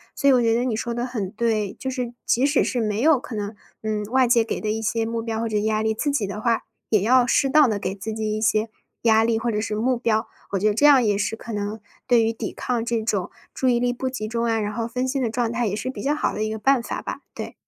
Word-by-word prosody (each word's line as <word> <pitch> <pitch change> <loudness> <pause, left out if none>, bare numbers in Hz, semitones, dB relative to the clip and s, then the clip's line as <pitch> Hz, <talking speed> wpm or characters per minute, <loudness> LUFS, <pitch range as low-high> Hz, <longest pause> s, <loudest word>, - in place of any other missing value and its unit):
所 280 - +1
以 275 - +7
我 250 - +4
觉 230 -1 +3
得 240 - +1
你 250 -3 0
说 235 +2 -3
的 240 +1 -1
很 225 -7 -3
对， 215 -2 -1
就 265 - -4
是 250 -2 -3
即 245 - +2
使 290 +2 +3
是 250 - -1
没 210 -1 -1
有 295 +2 +4
可 245 - -8
能， 205 0 -3 0.3
嗯， 215 -1 -1
外 255 +4 +3
界 235 -1 +4
给 225 - -3
的 215 - -2
一 220 +1 -2
些 225 +1 0
目 230 0 -2
标 225 -1 -3
或 230 - -1
者 215 -1 -1
压 215 +1 0
力， 220 0 +1
自 290 +7 -1
己 280 -7 0
的 200 +2 -5
话， 230 0 +1 0.3
也 215 -3 +3
要 245 +2 +4
适 270 - +3
当 300 -3 +6
地 210 - 0
给 190 -1 -3
自 200 +2 -6
己 215 -1 -2
一 215 - -3
些 215 +1 +2 0.3
压 220 -1 +5
力 225 0 +2
或 235 +1 -1
者 210 -1 -1
是 215 0 -2
目 250 +4 +1
标。 230 -2 0 0.3
我 - - +2
觉 210 - +2
得 - - +1
这 290 +8 +5
样 275 -4 +7
也 205 -1 +2
是 205 +2 -1
可 225 0 -8
能 205 +1 -3 0.3
对 240 -3 +5
于 225 0 +1
抵 225 - -5
抗 240 -2 -2
这 230 -1 -1
种 205 -5 -1 0.2
注 260 - -1
意 240 -1 +3
力 245 0 +1
不 260 +2 -3
集 235 -4 -4
中 230 +1 -1
啊， 225 -1 +1
然 210 0 -2
后 230 +1 -2
分 250 +2 -2
心 270 +1 -1
的 240 - 0
状 235 0 -1
态， 235 -1 0
也 200 - -1
是 215 - -5
比 210 - -7
较 290 +5 +1
好 - - -1
的 215 - -2
一 215 - -2
个 220 - -3
办 270 +3 +3
法 - - -4
吧。 - - -5 0.2
对。 - - -6
225 Hz, 320 characters per minute, -23 LUFS, 215-245 Hz, 0.3 s, 以